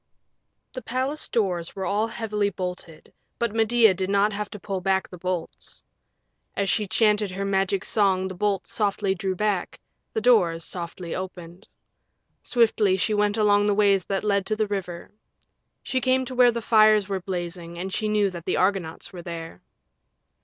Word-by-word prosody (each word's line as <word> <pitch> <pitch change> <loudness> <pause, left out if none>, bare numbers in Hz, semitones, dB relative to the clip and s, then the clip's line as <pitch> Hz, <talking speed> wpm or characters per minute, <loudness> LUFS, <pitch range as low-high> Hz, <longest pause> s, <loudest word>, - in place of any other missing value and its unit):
The 255 - -6
palace 260 +6 -2
doors 180 -7 -1
were 190 -1 -3
all 205 +4 +1
heavily 210 -3 -1
bolted, 180 -4 -7 0.2
but 235 -3 -1
Medea 225 -1 +4
did 185 +1 -3
not 200 +1 +2
have 210 0 -4
to 210 - -9
pull 195 -1 -4
back 190 0 +1
the 180 - -12
bolts. 180 -1 -5 0.7
As 200 -1 0
she 210 -2 0
chanted 210 0 +2
her 195 +2 -4
Magic 195 0 0
Song 190 -3 +2
the 190 - -6
bolts 195 +1 -1
softly 200 -2 0
drew 190 0 -3
back, 205 -2 -1 0.3
the - - 0
doors 190 -8 +3
softly 170 -1 -6
opened. 180 -2 -7 0.7
Swiftly 220 -5 +2
she 215 +3 0
went 210 0 +1
along 205 -1 +3
the 205 - +2
ways 200 -2 +3
that 195 -1 -2
led 200 -2 +1
to 215 - 0
the 215 0 0
river. 190 -4 -5 0.7
She 260 -1 -1
came 260 0 +2
to 255 - -7
where 250 -1 +5
fires 215 -3 +4
were 195 -2 -3
blazing 175 -2 -5
and 185 +2 -5
she 215 - -1
knew 210 -2 +2
that 170 -2 -9
the - - 0
Argonauts 185 -4 -1
were 180 - -7
there. 165 - -8
200 Hz, 170 wpm, -25 LUFS, 185-215 Hz, 0.7 s, where